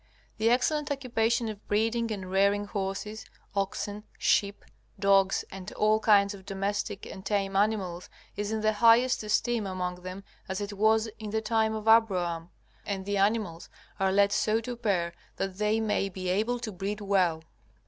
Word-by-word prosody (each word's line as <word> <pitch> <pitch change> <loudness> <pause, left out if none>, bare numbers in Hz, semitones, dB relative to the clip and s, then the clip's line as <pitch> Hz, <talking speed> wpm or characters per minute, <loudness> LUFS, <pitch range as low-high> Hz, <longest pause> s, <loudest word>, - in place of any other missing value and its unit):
The 225 +1 +3
excellent 290 +5 +1
occupation 240 -4 0
of 210 -2 -7
breeding 225 +2 +1
and 190 -3 -5
rearing 200 +2 +3
horses, 200 +2 -4 0.3
oxen, 205 +1 -2
sheep, 200 0 +1 0.3
dogs, 195 -1 +3
and 190 0 -8
all 215 +1 +3
kinds 205 -2 +4
of 195 -1 -11
domestic 195 +1 -3
and 190 - -9
tame 195 -1 -1
animals 195 -4 0 0.3
is 205 +1 -3
in 220 0 -1
the 215 0 +2
highest 230 +4 +5
esteem 220 0 0
among 180 -1 -4
them 185 +2 -7 0.3
as 190 +1 -2
it 205 0 -4
was 220 +2 +3
in 215 -1 -5
the 220 +1 0
time 220 0 +1
of 215 0 -6
Abraham. 180 -7 +3 0.3
And 195 -2 -4
the 205 0 -1
animals 200 -4 0 0.3
are 190 0 +2
led 200 +1 +4
so 215 +2 +2
to 245 +2 -5
pair 190 -7 0 0.2
that 195 0 -4
they 210 +1 +2
may 210 -2 0
be 185 -1 -5
able 220 +6 +1
to 220 - -4
breed 200 +2 -4
well. 185 -6 +1
205 Hz, 170 wpm, -28 LUFS, 195-220 Hz, 0.3 s, highest